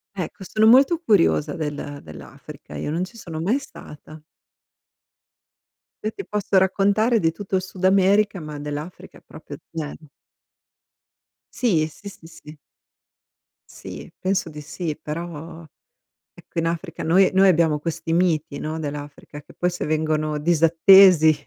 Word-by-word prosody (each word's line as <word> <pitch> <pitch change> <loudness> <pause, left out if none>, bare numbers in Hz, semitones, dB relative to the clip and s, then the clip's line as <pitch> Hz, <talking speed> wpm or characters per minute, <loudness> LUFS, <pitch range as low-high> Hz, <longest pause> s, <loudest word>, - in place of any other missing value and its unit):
Ecco 190 +1 -6
sono 215 +3 +2
molto 270 +8 +6
curiosa 190 - +2
del 145 -2 -5
dell'Africa, 75 0 -12
io 75 - -4
non 165 +4 -2
ci 195 +6 -7
sono 165 -7 -7
mai 205 +11 +1
stata. 155 - -13 1.8
Io 215 - 0
ti 395 - -9
posso 205 -2 0
raccontare 200 +5 +2
di 165 - +2
tutto 195 +4 -7
il 185 - +2
Sud 185 0 -8
America, 195 +1 +3
ma 150 -2 -7
dell'Africa 150 +4 -8
proprio 155 -2 -11 0.2
0. 155 -1 -7 1.5
Sì, 175 -11 +1
sì, 180 +6 -11
sì, 185 -4 -14
sì. 155 -2 -14 1.1
Sì, - - -10
penso 185 -2 -1
di 150 -1 -9
sì, 155 +1 -5
però 165 +1 -7 0.7
ecco - - -6
in 165 - -1
Africa 165 0 -4
noi 185 +4 +4
noi 190 +1 +5
abbiamo 160 -4 +3
questi 165 +1 -4
miti, 165 -4 0
no, 155 +1 -4
dell'Africa, 145 0 -7
che - - -19
poi 180 - -1
se 180 - -5
vengono 155 0 -1
disattesi. 165 +1 +6
165 Hz, 135 wpm, -22 LUFS, 155-190 Hz, 1.8 s, molto